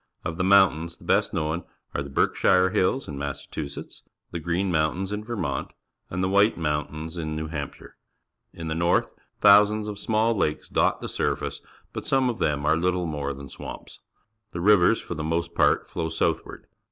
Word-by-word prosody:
Of 80 - -3
the 90 - 0
mountains 90 -4 +4
the - - -18
best - - +2
known 80 +2 -2 0.3
are - - -1
the 70 - -6
Berkshire 90 +6 +3
Hill 100 -1 +2
s 135 - -7
in 70 -2 -6
Massachusetts, 70 +1 -6 0.3
the 85 - -4
Green__Moitntains 85 +2 0
in 105 +1 -3
"\"ermont, 95 - -3 0.4
and 90 +1 -2
the - - +2
WJiij£__MjiyJitaim 80 -5 0
in. 80 -1 -3
New_ 80 0 -4
Hampshire. 70 -3 -7 0.5
In 80 -1 -7
the 80 - -1
north 85 +2 +1 0.3
thousands 105 +1 +6
of 105 -1 -5
small 110 +2 +2
laKeS 75 -6 -1
dot - - +2
the - - -4
surface, - - -2 0.3
but - - -5
some 130 -2 +3
of 115 - -9
them 75 -1 0
are 80 +1 +4
little 90 +1 0
more 75 -3 -3
than 70 0 -8
swamps. - - -9 0.5
The 85 - -4
rivers 100 +3 +5
for - - -6
the 80 -1 -4
most 85 +2 -1
part - - +3
flow 80 -2 -3
southward. 80 - -2
85 Hz, 175 wpm, -25 LUFS, 75-100 Hz, 0.5 s, thousands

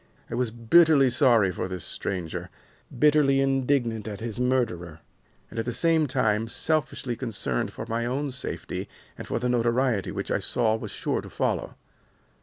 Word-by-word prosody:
I - - -4
was 125 -2 0
bitterly 135 +4 +5
sorry 120 -7 +4
for 90 - -3
this 90 -3 -4
stranger, 90 -4 -3 0.5
bitterly 145 -2 +4
indignant 135 -5 +1
at 105 -2 -5
his 115 -1 -5
murderer, 100 -11 -1 0.5
and, 115 - -5
at 115 - -2
the 120 - -2
same 165 0 +2
time, 115 -4 +1
selfishly 140 -2 -1
concerned 105 - -2
for 110 - -7
my 115 +1 -1
own 140 +3 -2
safety 130 +1 -5 0.3
and - - -9
for - - -1
the 125 +2 -1
notoriety 120 -2 +1
which - - -4
I - - +2
saw 110 -3 +1
was 110 - -6
sure - - -2
to - - -11
follow. - - -2
120 Hz, 165 wpm, -26 LUFS, 110-135 Hz, 0.5 s, bitterly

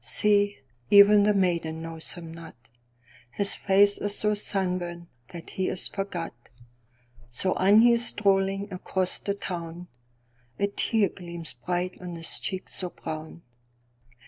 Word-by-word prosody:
See, 205 -1 +2 0.3
even 205 +1 +7
the 210 +1 +3
maiden 170 -4 -1
knows 165 -1 -5
him 165 -2 -10
not:His 120 - -3
face 200 +1 +3
is 205 0 -1
so 210 0 +1
sunburnt 180 -4 -3 0.2
that 170 +3 -10
he 190 - -2
is 185 - -2
forgot. 195 -4 -5 1.0
So 185 +10 0
on 200 +4 +5
he 240 +1 +6
is 235 0 +4
strolling 195 0 0
across 185 0 0
the 200 - -3
town:A 120 -8 -8
tear 205 0 +1
gleams 170 -4 -6
bright 180 +9 -4
on 175 -1 -7
his 165 0 -1
cheek 190 -1 -4
so 180 - -1
brown. 160 0 -8
180 Hz, 130 wpm, -26 LUFS, 165-200 Hz, 1.0 s, even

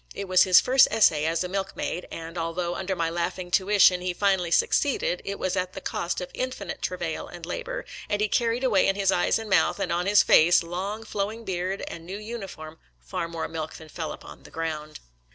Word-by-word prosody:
It 200 - -5
was 185 0 +5
his 185 -1 +7
first 265 +1 +5
essay 160 -9 +3
as 165 +2 0
a - - -3
milk 195 +1 -3
maid, 180 - -4
and, 165 +1 -8
although 170 +1 -2
under 190 +1 -3
my 165 -2 -1
laughing 175 +1 -3
tuition 190 -1 +4
he 180 -1 -2
finally 190 -3 +1
succeeded, 180 - +1
it 200 0 -4
was 185 - -1
at 185 0 -2
the - - -6
cost 175 +1 -3
of 180 - -6
in 255 - -2
finite 255 - -7
travail - - -3
and - - -9
labor, - - -5 0.2
and 205 - 0
he 210 - +2
carried 235 +3 0
away 215 -8 +3
in 195 - +2
his 195 -1 +2
eyes 175 - +2
and 225 -1 -6
mouth, 190 -3 +2
and - - -2
on 175 +2 0
his 205 +1 +6
face, 175 +2 +5
long 190 +6 -4
flowing 220 +2 -4
beard, 185 +1 -3
and 165 - -8
new 185 +4 -6
uniform 195 -8 -8 0.2
far 65 - -4
more 165 -1 -4
milk 160 -1 -5
than 160 -1 -12
fell 160 -1 -5
upon - - -11
the - - -14
ground. 155 -2 -5
185 Hz, 220 wpm, -26 LUFS, 170-205 Hz, 0.2 s, his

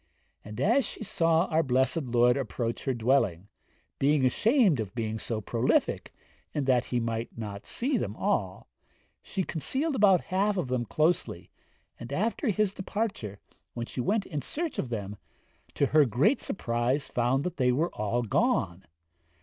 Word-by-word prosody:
and 105 0 -8
as 245 +7 +3
she - - -6
saw 165 -5 +2
our 160 +1 +3
blessed 130 +2 +1
Lord 120 0 +3
approach 120 -3 -3
her 135 - +1
dwelling, 115 -6 +1 0.5
being 140 -1 +3
ashamed 210 - +3
of 105 0 -4
being 110 -1 -2
so 115 -1 -3
prolific, 115 +4 0 0.4
and 145 -3 0
that 130 -2 +3
He 125 - -1
might 115 0 -3
not 105 -3 -6
see 270 +4 0
them - - -3
all, - - -1 0.5
she 190 - -3
concealed 265 - -1
about 195 -6 +5
half 200 +2 0
of 170 -8 -2
them 125 -2 -1
closely, 155 - 0 0.5
and 120 +2 -8
after 220 - -1
his 210 -1 +1
departure, 195 - -3 0.4
when 120 -1 -3
she 125 - -4
went 200 - 0
in 150 -5 -4
search 320 - -4
of 130 - -2
them, 105 -3 -4 0.6
to 140 - +3
her 150 +1 +4
great 135 - +2
surprise 120 -2 -1
found 125 +3 +1
they 145 -8 +1
were 155 +8 0
all 110 +3 -1
gone. 105 - 0
130 Hz, 160 wpm, -28 LUFS, 115-185 Hz, 0.6 s, about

